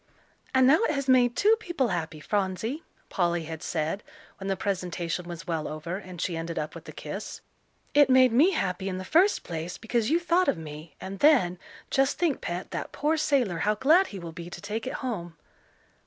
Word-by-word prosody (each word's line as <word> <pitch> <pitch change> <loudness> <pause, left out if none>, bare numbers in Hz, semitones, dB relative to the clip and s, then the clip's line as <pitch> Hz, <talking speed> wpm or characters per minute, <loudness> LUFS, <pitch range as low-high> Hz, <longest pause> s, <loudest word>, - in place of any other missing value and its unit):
"And 260 -1 +5
now 305 +9 +6
it - - 0
has 275 -1 -2
made 245 -2 +4
two 425 - +5
people 345 - -1
happy, 160 -4 -3
Phronsie," 205 - -2 0.3
Polly 175 -2 0
had 160 0 -7
said, 160 +4 -2 0.4
when 195 - -5
the 195 - +1
presentation 180 -3 -2
was 170 -1 -7
well 160 -3 -2
over, 155 +4 -4
and 185 -3 -10
she 175 0 -1
ended 165 +1 -4
up 150 0 -3
with - - -10
a - - -6
kiss. - - -7 0.5
"It 290 -2 +6
made 255 -1 +6
me 305 +12 +5
happy 190 - -1
in 185 - -3
the 185 - -6
first 365 - +3
place 165 +1 -5
because 225 0 -1
you 330 +3 +3
thought 350 +1 +2
of - - +2
me, 155 0 -9
and 195 +1 -7
then, 235 - +4 0.3
just 270 +1 +2
think, 335 -6 +1
Pet, 175 +2 -4
that - - -4
poor 305 +2 +1
sailor, 260 - +1
how 210 +5 +2
glad 320 - +4
he 200 - -8
will 170 -2 -7
be 170 +1 -8
to - - -8
take 220 +3 -4
it - - -3
home." 175 -9 -4
195 Hz, 205 wpm, -27 LUFS, 170-270 Hz, 0.5 s, now